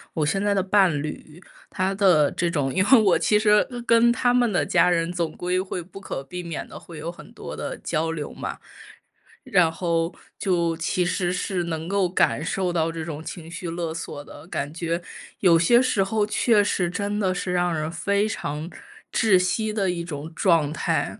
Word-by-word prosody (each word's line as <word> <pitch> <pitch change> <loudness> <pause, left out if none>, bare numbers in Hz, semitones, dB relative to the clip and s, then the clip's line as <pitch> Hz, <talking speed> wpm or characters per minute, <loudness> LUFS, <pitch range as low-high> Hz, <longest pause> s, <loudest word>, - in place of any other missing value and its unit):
我 155 - +1
现 195 +7 0
在 205 0 +2
的 195 - +2
伴 190 -1 +4
侣， 150 +2 -8 0.3
他 185 +1 -1
的 180 -8 +4
这 175 - 0
种 140 -5 -1
因 185 - +3
为 255 -4 +8
我 195 -4 +4
其 210 -1 +3
实 210 -1 +4 0.2
跟 230 +1 +5
他 245 0 +2
们 245 -2 +3
的 180 - +1
家 180 0 +3
人 165 -1 +1
总 170 -3 -1
归 180 +3 -1
会 185 -1 -4
不 190 +3 -12
可 190 - -5
避 180 +6 -7
免 170 -2 -5
地 - - -10
会 170 - -11
有 160 +3 -5
很 175 - -11
多 - - -8
的 - - -5
交 160 +1 -1
流 155 -3 -5
嘛。 - - -6 0.8
然 185 - +3
后 165 0 -1 0.3
就 170 -4 +1
其 175 +2 0
实 175 0 0
是 180 -1 -2
能 160 -1 -4
够 195 -2 +1
感 175 - +1
受 180 +1 -1
到 165 -1 +1
这 165 -1 -5
种 155 -1 -6
情 165 -2 -8
绪 175 0 -5
勒 165 -1 -3
索 145 -3 -6
的， 160 - -12
感 145 -3 -4
觉 170 0 -2 0.4
有 170 -4 +5
些 235 +8 +5
时 255 -6 +2
候 210 +2 0
确 215 0 +3
实 180 -3 0
真 200 +3 -2
的 190 -3 +1
是 180 0 -2
让 175 0 +1
人 155 0 -2
非 200 +5 0
常 150 -5 -4 0.5
窒 215 -5 +4
息 215 +4 0
的 195 -4 +1
一 170 -1 -4
种 160 -1 -7
状 160 -6 +2
态。 - - -1
175 Hz, 220 characters per minute, -24 LUFS, 165-195 Hz, 0.8 s, 为